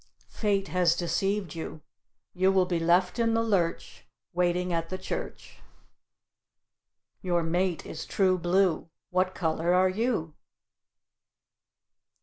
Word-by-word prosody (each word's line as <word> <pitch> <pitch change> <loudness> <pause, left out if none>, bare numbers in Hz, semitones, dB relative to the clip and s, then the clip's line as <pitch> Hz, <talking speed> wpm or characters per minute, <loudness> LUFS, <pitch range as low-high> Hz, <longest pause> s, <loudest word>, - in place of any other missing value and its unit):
Fate 200 -3 -1
has 180 -2 +3
deceived 185 +1 -1
you; 160 -1 -6 0.5
you 185 +1 +3
will 190 -1 +3
be 175 -2 -1
left 180 +6 +2
in 230 -1 +2
the 230 - +2
lurch, 190 -7 -1 0.3
waiting 180 0 +1
at 165 0 -2
the 185 - -3
Church. - - -6 1.6
Your 175 -2 0
mate 175 +1 0
is - - -7
true 185 -2 +2
blue; 175 -1 +1 0.2
what 185 +1 +1
color 165 +1 +1
are 185 +1 +4
you? 195 -6 -1
180 Hz, 120 wpm, -28 LUFS, 170-190 Hz, 1.6 s, are